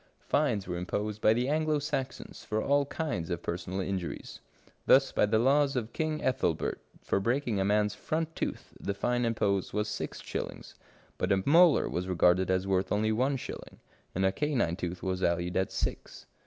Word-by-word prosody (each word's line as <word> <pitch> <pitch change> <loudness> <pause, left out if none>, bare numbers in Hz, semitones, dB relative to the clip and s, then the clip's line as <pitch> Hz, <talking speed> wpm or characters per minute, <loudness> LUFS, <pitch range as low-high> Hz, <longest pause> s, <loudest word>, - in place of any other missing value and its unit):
Fines 125 -10 +1
were 90 -1 -3
imposed 105 +4 -3
by 110 - +5
the 120 +3 +1
Anglo 155 +1 +1
Saxons 145 -2 -4
for 110 - -1
all 140 +3 +2
kinds 105 - -3
of 85 -1 -3
personal 90 +2 -3
injuries. 95 -3 -4 0.5
Thus 135 0 +6
by - - +2
the 110 +1 +2
laws 140 +4 +3
of 120 -3 -3
King 155 -1 -2
Ethelbert, 90 -10 0 0.2
for - - +1
breaking 120 0 0
a - - +2
man's 105 +1 +2
front 160 +9 -3
tooth - - -4
the 100 - -3
fine 120 +4 0
imposed 100 -4 0
was 105 +1 0
six - - -4
shillings, - - -6 0.5
but 90 - 0
a 95 -1 +2
molar 165 +2 +6
was 90 +1 -3
regarded 90 +1 +3
as 95 0 +1
worth 95 -1 0
only 110 +1 +2
one 130 +5 +1
shilling, - - -8 0.4
and 95 +2 +1
a 95 - +4
canine 120 - 0
tooth 90 0 -5
was 95 -1 -1
valued 85 0 0
at 95 0 +1
six. - - -4
105 Hz, 180 wpm, -30 LUFS, 95-135 Hz, 0.5 s, Thus